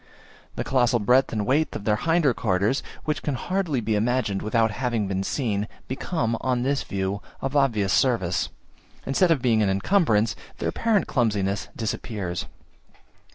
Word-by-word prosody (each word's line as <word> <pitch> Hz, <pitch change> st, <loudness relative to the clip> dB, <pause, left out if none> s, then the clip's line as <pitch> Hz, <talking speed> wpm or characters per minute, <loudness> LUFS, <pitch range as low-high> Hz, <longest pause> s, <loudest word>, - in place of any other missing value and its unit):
The -, -, -2 dB
colossal 125 Hz, -2 st, +2 dB
breadth 125 Hz, +5 st, +3 dB
and 105 Hz, -2 st, -1 dB
weight 150 Hz, +6 st, +1 dB
of -, -, -5 dB
their 105 Hz, 0 st, +2 dB
hinder 165 Hz, -1 st, +2 dB
quarters, 100 Hz, +7 st, +1 dB, 0.2 s
which 155 Hz, -1 st, -1 dB
can 145 Hz, -, -2 dB
hardly 175 Hz, -2 st, -1 dB
be 110 Hz, 0 st, -1 dB
imagined 110 Hz, -2 st, 0 dB
without 110 Hz, +1 st, +1 dB
having 115 Hz, -2 st, -1 dB
been 95 Hz, 0 st, -1 dB
seen, 105 Hz, -2 st, -1 dB, 0.2 s
become 130 Hz, -3 st, -1 dB
on 125 Hz, -2 st, 0 dB
this 140 Hz, +1 st, +1 dB
view, 100 Hz, +1 st, -3 dB, 0.2 s
of 135 Hz, +1 st, -3 dB
obvious 110 Hz, -9 st, +2 dB
service, 115 Hz, -10 st, +1 dB, 0.6 s
instead 170 Hz, +7 st, +2 dB
of 155 Hz, -6 st, +2 dB
being 115 Hz, -3 st, +3 dB
an 100 Hz, -, +2 dB
incumbrance: 110 Hz, -, +2 dB, 0.2 s
their -, -, -1 dB
apparent 225 Hz, -3 st, +1 dB
clumsiness 100 Hz, -5 st, 0 dB
disappears. 100 Hz, -5 st, -3 dB
115 Hz, 155 wpm, -25 LUFS, 105-135 Hz, 0.6 s, breadth